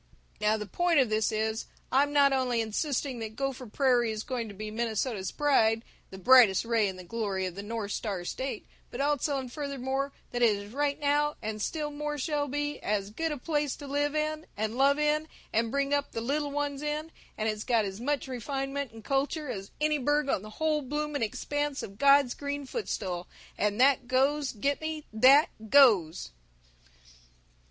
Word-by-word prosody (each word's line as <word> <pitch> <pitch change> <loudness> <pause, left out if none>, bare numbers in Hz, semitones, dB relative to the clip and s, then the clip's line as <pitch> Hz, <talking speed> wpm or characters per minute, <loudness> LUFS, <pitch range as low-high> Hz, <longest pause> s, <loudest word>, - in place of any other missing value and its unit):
"Now 210 +1 +2
the 210 - -5
point 340 - +2
of 250 -5 +2
this 215 +1 +2
is: 220 +1 -1 0.2
I'm 285 +2 +3
not 280 -1 +5
only 255 -3 +1
insisting 250 +3 -1
that 220 -1 -6
Gopher 270 -1 -3
Prairie 240 -1 +2
is 215 0 -4
going 245 -4 -3
to 205 - -9
be 215 +2 -6
Minnesota's 220 -2 -2
pride, 230 -7 +2 0.3
the 190 - -9
brightest 225 -1 +6
ray 230 -3 +2
in 190 - -4
the 185 - -9
glory 195 -1 -2
of 185 - -4
the 200 - -6
North 210 -1 -4
Star 195 -6 -3
State, 260 +3 -4 0.2
but 240 - -7
also 285 0 +1
and 255 -2 -6
furthermore 275 -1 -2 0.2
that 245 - -2
it 225 -3 +5
is 200 +2 -8
right 285 +1 0
now, 295 0 +1
and 215 0 -4
still 300 +5 -2
more 295 0 -3
shall 290 0 -1
be, 290 +1 -2
as 205 -1 -2
good 325 +8 -2
a 300 - -3
place 295 0 -1
to 290 - -10
live 290 +1 -1
in, 310 +1 -2
and 220 +2 -2
love 275 +2 +4
in, 300 +1 +1 0.3
and 225 +1 +2
bring 280 +2 0
up 285 0 0
the 225 - -3
Little 290 +5 -1
Ones 285 -1 -2
in, 300 +2 -3 0.3
and 215 - -1
it's 215 -1 -2
got 230 -4 +2
as 195 +1 -5
much 285 +1 -1
refinement 270 +2 -3
and 225 -1 -12
culture, 280 +3 -1
as 195 -1 -6
any 300 0 +2
burg 290 +2 +1
on 195 - +1
the 215 - -9
whole 305 +6 0
bloomin' 295 +1 -3
expanse 290 +6 -2
of 195 +1 -9
God's 280 -2 +5
Green 285 0 -4
Footstool, 190 - -4 0.3
and 210 +1 0
that 260 -1 +4
goes, 270 +2 +2
get 275 +7 -1
me, 315 -1 -4
that 270 +8 +6 0.2
goes!" 205 - +5
265 Hz, 190 wpm, -29 LUFS, 220-290 Hz, 0.3 s, brightest